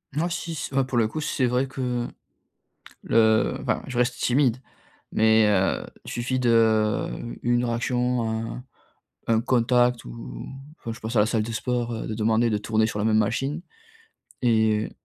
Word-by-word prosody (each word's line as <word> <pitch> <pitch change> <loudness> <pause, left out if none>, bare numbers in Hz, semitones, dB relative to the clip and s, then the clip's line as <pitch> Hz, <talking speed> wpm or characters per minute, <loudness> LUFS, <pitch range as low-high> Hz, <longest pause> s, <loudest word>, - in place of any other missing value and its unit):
Moi 165 +3 +1
si 170 -1 -4
s 145 - -5
heu, 135 0 +3
pour 130 -1 -3
le 115 -2 +3
coup 155 +8 -5
c'est 145 -3 0
vrai 125 +2 +1
que 125 -2 -2 1.0
le 110 -1 +3
enfin - - 0
je 130 - -6
reste 125 +1 +1
timide 125 -1 +2 0.6
mais, 110 0 +4
heu, 95 -2 +1 0.2
suffit 125 +2 -2
de, 110 -3 +3 0.3
une 120 0 +2
réaction, 125 +1 0
un 110 +1 -3
un 125 - -9 0.6
un 115 -1 +3
contact 125 0 +2
ou - - -8 0.3
enfin 115 - -5
je 120 - -12
pense 115 +2 -4
à - - +6
la 105 - +5
salle 110 -1 0
de 115 - -5
sport, 120 +1 -2
heu, 110 - -4
de - - -3
demander 115 +2 +2
de 105 - +1
tourner 110 +1 +1
sur 110 - -4
la 105 - -1
même 110 -1 +3
machine, 135 +9 0 0.8
et 110 -2 +2
115 Hz, 175 wpm, -25 LUFS, 110-125 Hz, 1.0 s, à